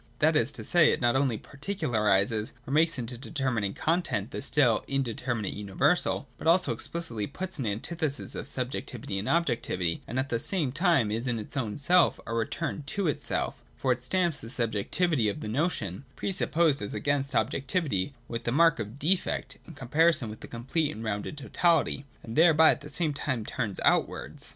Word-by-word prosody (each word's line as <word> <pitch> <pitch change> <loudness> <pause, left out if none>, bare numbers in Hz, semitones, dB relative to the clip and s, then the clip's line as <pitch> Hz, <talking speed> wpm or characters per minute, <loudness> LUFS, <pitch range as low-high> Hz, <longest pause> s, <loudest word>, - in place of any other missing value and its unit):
That 155 +1 +3
is 120 0 +2
to - - -7
say, 170 -3 +5
it - - 0
not 120 -1 +2
only 135 -4 +2
particularises 110 - 0
or 135 - -3
makes 160 0 +3
into 125 0 -4
a - - -7
determinate 130 -8 -2
content 155 - -1
the - - -4
still 135 -5 +2
indeter 130 -2 -1
minate 105 -4 -3
universal, 135 - 0
but - - -4
also 180 +2 +4
explicitly 120 -12 -2
puts 185 +2 -6
an 125 - -1
antithesis 145 +8 -1
of - - -5
subjectivity 125 -5 -2
and 100 - -3
objectivity, 105 - 0
and 125 - -4
at 130 +2 0
the 115 - 0
same 155 -2 +1
time 140 - +2
is 115 +4 -2
in 120 -2 0
its 110 +5 -6
own 115 -6 -2
self 175 +5 +3
a - - -4
return 145 +8 -2
to 195 +4 -1
itself; 150 - -2 0.2
for 130 - +1
it 125 0 0
stamps 170 +3 +1
the - - -9
subjec 115 -4 -2
tivity 155 -11 +2
of 100 - -5
the - - -5
notion, 115 - -1
pre - - -2
supposed 165 -5 +2
as 100 - -4
against 140 -1 0
objectivity, 135 - 0
with 115 0 -4
the 120 - +1
mark 165 +1 +4
of 110 +3 -5
defect, 175 +6 -1
in - - -11
comparison 155 -2 +2
with 110 - -10
the - - -9
complete 135 +7 -1
and 110 - -7
rounded 110 +6 -3
totality, 145 -1 +1 0.2
and 115 -1 -7
thereby 160 -1 +7
at - - -3
the - - -9
same 160 -4 0
time 130 -6 -2
turns 110 -6 -2
outwards. - - 0
135 Hz, 190 wpm, -28 LUFS, 115-160 Hz, 0.2 s, thereby